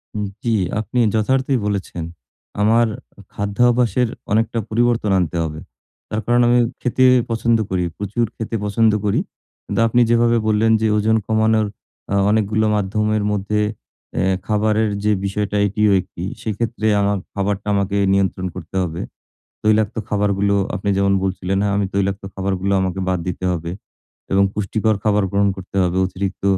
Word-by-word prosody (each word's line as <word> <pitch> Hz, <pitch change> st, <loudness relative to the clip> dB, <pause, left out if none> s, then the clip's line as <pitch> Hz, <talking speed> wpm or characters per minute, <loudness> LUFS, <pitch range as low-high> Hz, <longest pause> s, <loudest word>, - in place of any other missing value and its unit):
হুম, 105 Hz, -1 st, -1 dB, 0.2 s
জি 115 Hz, -, +1 dB, 0.3 s
আপনি 115 Hz, +3 st, -2 dB
যথার্থই 130 Hz, +4 st, +1 dB
বলেছেন। 100 Hz, -4 st, -3 dB, 0.6 s
আমার 115 Hz, +2 st, +4 dB, 0.5 s
খাদ্যাভ্যাসের 120 Hz, +3 st, +2 dB, 0.2 s
অনেকটা 115 Hz, +2 st, +1 dB
পরিবর্তন 115 Hz, -2 st, +1 dB
আনতে 85 Hz, -1 st, -1 dB
হবে। 80 Hz, -1 st, -5 dB, 0.5 s
তার 105 Hz, -, -2 dB
কারণ, 120 Hz, +1 st, +3 dB
আমি 120 Hz, +1 st, +4 dB, 0.2 s
খেতে 125 Hz, +1 st, +1 dB, 0.3 s
পছন্দ 115 Hz, 0 st, +2 dB
করি। 95 Hz, -1 st, 0 dB
প্রচুর 105 Hz, +4 st, -1 dB
খেতে 115 Hz, 0 st, -4 dB
পছন্দ 110 Hz, +2 st, +3 dB
করি। 100 Hz, -, +2 dB, 0.5 s
কিন্তু -, -, -2 dB
আপনি 120 Hz, +2 st, +3 dB
যেভাবে 120 Hz, 0 st, +3 dB
বললেন। 110 Hz, +1 st, +3 dB
যে 110 Hz, -, +2 dB
ওজন 110 Hz, +1 st, +2 dB
কমানোর 110 Hz, -1 st, +2 dB, 0.5 s
আ -, -, +2 dB
অনেকগুলো 110 Hz, 0 st, +1 dB
মাধ্যমের 105 Hz, +1 st, 0 dB
মধ্যে, 105 Hz, +1 st, -1 dB, 0.6 s
এ -, -, +2 dB, 0.3 s
খাবারের 110 Hz, 0 st, +1 dB
যে 105 Hz, -, +3 dB
বিষয়টা, 105 Hz, +1 st, -2 dB
এটিও 105 Hz, +1 st, +2 dB
১ -, -, -5 dB
টি। 85 Hz, -, -5 dB, 0.2 s
সেক্ষেত্রে, 110 Hz, +1 st, -2 dB
আমার 100 Hz, 0 st, +1 dB, 0.2 s
খাবারটা 100 Hz, 0 st, -2 dB
আমাকে 100 Hz, 0 st, 0 dB, 0.2 s
নিয়ন্ত্রণ 95 Hz, -1 st, 0 dB
করতে -, -, -9 dB
হবে। 85 Hz, -1 st, -4 dB, 0.6 s
তৈলাক্ত 110 Hz, +1 st, +2 dB
খাবারগুলো, 100 Hz, -1 st, +1 dB, 0.2 s
আপনি 100 Hz, -, -3 dB
যেমন 100 Hz, 0 st, +2 dB
বলছিলেন, 95 Hz, 0 st, -1 dB
হ্যাঁ, 100 Hz, -1 st, +1 dB
আমি 100 Hz, -1 st, +1 dB
তৈলাক্ত 100 Hz, 0 st, 0 dB
খাবারগুলো, 95 Hz, 0 st, -1 dB
আমাকে 95 Hz, 0 st, -2 dB
বাদ 90 Hz, -1 st, +1 dB
দিতে 90 Hz, +1 st, -4 dB
হবে 85 Hz, -1 st, -4 dB, 0.6 s
এবং 100 Hz, 0 st, +4 dB
পুষ্টিকর 105 Hz, +1 st, 0 dB
খাবার 105 Hz, -2 st, +2 dB
গ্রহণ 100 Hz, 0 st, +2 dB
করতে 95 Hz, 0 st, -9 dB
হবে। 90 Hz, 0 st, 0 dB
অতিরিক্ত 95 Hz, +1 st, -5 dB
105 Hz, 150 wpm, -20 LUFS, 100-110 Hz, 0.6 s, আমার